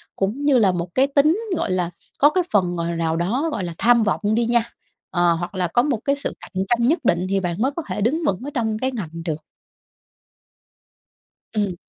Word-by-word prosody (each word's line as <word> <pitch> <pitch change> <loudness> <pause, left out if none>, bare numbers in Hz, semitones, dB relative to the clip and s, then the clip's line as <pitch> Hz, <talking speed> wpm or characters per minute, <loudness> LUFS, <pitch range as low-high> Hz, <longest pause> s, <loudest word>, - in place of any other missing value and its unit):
cũng 215 +9 -2
như 285 -3 +5
là 200 -5 +4
một 175 0 -4
cái 265 +1 +4
tính, 300 +6 +3 0.2
gọi - - -1
là, 180 -2 0 0.3
có 290 - +7
cái 365 +3 +1
phần, 180 -4 +2
gọi 170 0 -2
là, 170 - -2
nào 165 -1 0
đó, 235 - 0
gọi 210 - -3
là, 170 -1 -4
tham 235 -1 +4
vọng 215 - 0
đi 235 - +2
nha, 235 0 +3 0.5
ờ, 175 -1 +3
hoặc 175 +3 -4
là 180 -1 0
có 205 +8 +3
một 270 -7 0
cái 280 - +2
sự 285 - -4
cạnh 190 0 -4
tranh 235 +2 +2
nhất 320 +3 +3
định, 175 -2 +2
thì 195 0 +2
bạn 175 -2 -2
mới 265 +3 +2
có 335 - -3
thể - - -3
đứng 300 +10 +1
vững 190 - +1
ở 285 - -4
trong 220 -3 -1
cái 260 +2 0
ngành 210 -11 -5 0.2
được. 155 -2 -3 2.1
Ừm. 205 -4 0
215 Hz, 225 wpm, -22 LUFS, 175-265 Hz, 2.1 s, có